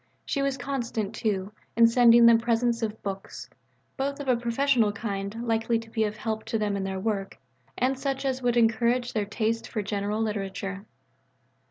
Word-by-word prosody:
She 280 - -1
was 275 -1 0
constant, 240 -5 -3
too, 205 -3 -2 0.2
in 230 +1 +7
sending 235 0 +6
them 230 -1 +7
presents 235 0 +1
of 220 -1 -4
books 195 -1 -6 0.5
both 280 +1 -2
of 285 - -6
a 255 - +4
professional 235 -1 +2
kind 205 +1 -4
likely 230 0 +1
to 225 0 -9
be 220 -1 +1
of 210 0 -4
help 220 0 -3
to 225 - -1
them 210 -2 -1
in 195 - -2
their 190 0 -3
work, 195 -1 -2 0.4
and 260 +1 +1
such 270 0 -2
as 260 -1 -1
would 245 -1 +1
encourage 235 +2 +2
a 210 -2 +1
taste 225 +2 -1
for 215 - -3
general 205 +1 -2
literature. 195 -2 -3
225 Hz, 180 wpm, -27 LUFS, 210-245 Hz, 0.5 s, in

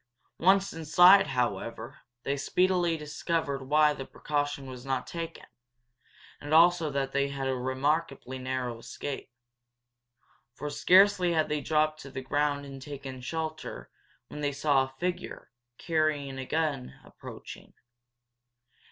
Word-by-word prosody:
Once 195 +3 +3
inside, 175 +5 +6
however, 115 -2 -3 0.2
they 140 - -1
speedily 175 +3 +1
discovered 150 -1 -2
why 150 +3 +3
that 135 -2 -8
precaution 145 -2 -2
was 130 -2 -9
not 135 -1 -2
taken 165 -1 -6 0.9
and 145 +2 -1
also 170 -1 +5
that 135 -1 -2
they 140 0 +1
had 140 -1 -6
had 135 - -1
a 130 - 0
remarkably 130 +1 -1
narrow 130 -2 -3
escape. 135 +4 -6 1.3
For 150 +3 -5
scarcely 185 +2 +5
had 155 -1 +1
they 150 -1 -1
dropped 155 0 +1
to 135 - -9
the 130 0 -6
ground 145 +1 0
and 135 -1 -9
taken 135 -2 -8
shelter 155 +3 -5 0.4
when 150 - -8
they 145 -1 0
saw 140 -2 +2
a 130 - -14
figure, 180 +2 -4 0.3
carrying 155 -5 -1
a 130 - -6
gun, 150 -5 -2
approaching. - - -11
145 Hz, 135 wpm, -29 LUFS, 135-160 Hz, 1.3 s, inside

